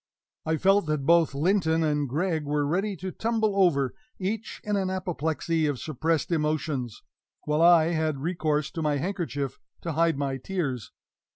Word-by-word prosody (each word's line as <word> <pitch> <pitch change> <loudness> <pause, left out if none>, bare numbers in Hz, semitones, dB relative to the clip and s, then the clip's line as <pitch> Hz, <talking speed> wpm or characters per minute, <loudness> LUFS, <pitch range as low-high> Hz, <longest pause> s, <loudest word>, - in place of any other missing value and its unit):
I 160 0 +1
felt 195 0 +3
that 150 -3 -1
both 165 -3 +4
Linton 165 0 +2
and 150 -3 0
Gregg 160 +3 0
were 145 0 0
ready 190 +7 0
to 185 0 -5
tumble 220 0 0
over, 150 -9 +3 0.2
each 210 +3 -3
in 210 0 -1
an 190 -2 0
apoplexy 165 -3 -1
of 145 -3 -1
suppressed 155 +4 -1
emotions; 150 -6 -1 0.4
while 150 +1 0
I 170 -1 +6
had 155 -4 0
recourse 155 -2 -1
to 165 - -4
my 150 -2 +1
handkerchief 160 -5 -3 0.2
to 170 - -3
hide 165 -1 +2
my 140 -1 -1
tears. 135 - -3
160 Hz, 160 wpm, -27 LUFS, 145-185 Hz, 0.4 s, I